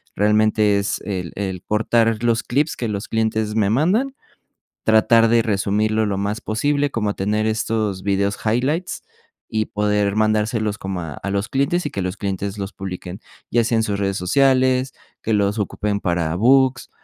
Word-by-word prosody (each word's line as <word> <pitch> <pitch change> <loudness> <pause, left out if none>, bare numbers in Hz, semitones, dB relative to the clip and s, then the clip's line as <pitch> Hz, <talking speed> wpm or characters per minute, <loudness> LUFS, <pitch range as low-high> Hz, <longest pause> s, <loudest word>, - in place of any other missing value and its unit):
Realmente 105 0 +3
es 100 +1 -2
el 90 -5 -4
el 95 -3 -4
portar 115 +2 +1
los 115 -1 +2
clips 145 +5 0
que 120 - -3
los 100 -1 -4
clientes 110 -1 -1
me 105 -2 +2
mandan. 195 - +1 0.7
Tratar 115 +1 +5
de 115 0 +4
resumirlo 110 +1 +1
lo 100 -2 -1
más 105 +2 -2
posible, 145 +6 0
como 105 -4 -1
tener 105 +3 -1
estos 110 -3 -1
vídeos 100 0 0
highlights 135 +11 -1 0.5
y 110 -1 0
poder 105 -1 0
mandárselos 110 0 +1
como 95 -1 -4
a 80 -4 -6
a 100 - -5
los 100 +1 -1
clientes 140 +6 0
y - - -3
que 95 - -3
los 90 0 -4
clientes 100 0 -3
los 100 +1 -5
publiquen, 95 0 -7 0.3
ya 120 -1 +2
sea 115 0 +1
en 110 - +2
sus 100 -2 -2
redes 100 0 -1
sociales, 130 +5 +2 0.3
que 110 - -1
los 105 +1 +1
ocupen 105 0 -2
para 85 -3 -1
books, 130 +4 +3
105 Hz, 170 wpm, -21 LUFS, 100-115 Hz, 0.7 s, Tratar